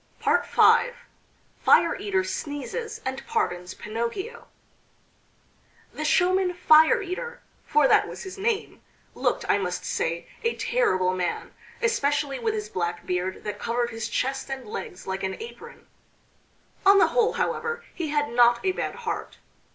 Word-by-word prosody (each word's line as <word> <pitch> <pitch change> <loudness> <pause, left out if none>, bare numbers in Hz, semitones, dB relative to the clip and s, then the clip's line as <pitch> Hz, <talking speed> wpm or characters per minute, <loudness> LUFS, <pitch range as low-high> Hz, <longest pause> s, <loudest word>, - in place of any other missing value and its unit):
V. 425 - +4 1.3
FIRE - - +5
EATER 390 -2 0
SNEEZES 325 - -5
AND 260 +1 -3
PARDONS 180 +1 -2
PINOCCHIO 235 - -5 1.5
The 305 - -5
showman 365 +3 +2
Fire 315 +3 +6
eater 390 +6 -5 0.3
for 300 -2 +4
that - - +4
was - - -8
his 380 -1 -7
name 430 +2 -2 0.3
looked, - - -1
I 205 - +3
must 180 -2 -3
say, 170 +1 -2
a 460 - 0
terrible 185 - +1
man, 180 -1 -3 0.3
especially 285 - +1
with 225 -2 -1
his 210 -1 -3
black 175 -3 -3
beard 180 +1 -2
that 210 -1 -5
covered 235 +2 -1
his 225 -1 -4
chest 270 +1 -2
and 270 -1 -5
legs 445 -2 -7
like 190 0 -3
an 190 0 -3
apron. 460 +1 -10 1.0
On 395 0 +7
the - - +5
whole, 470 -3 +2
however, 470 0 -2
he 335 -3 -3
had 295 0 0
not 240 0 +5
a 380 - +3
bad - - -3
heart. - - -4
290 Hz, 145 wpm, -25 LUFS, -, 1.5 s, On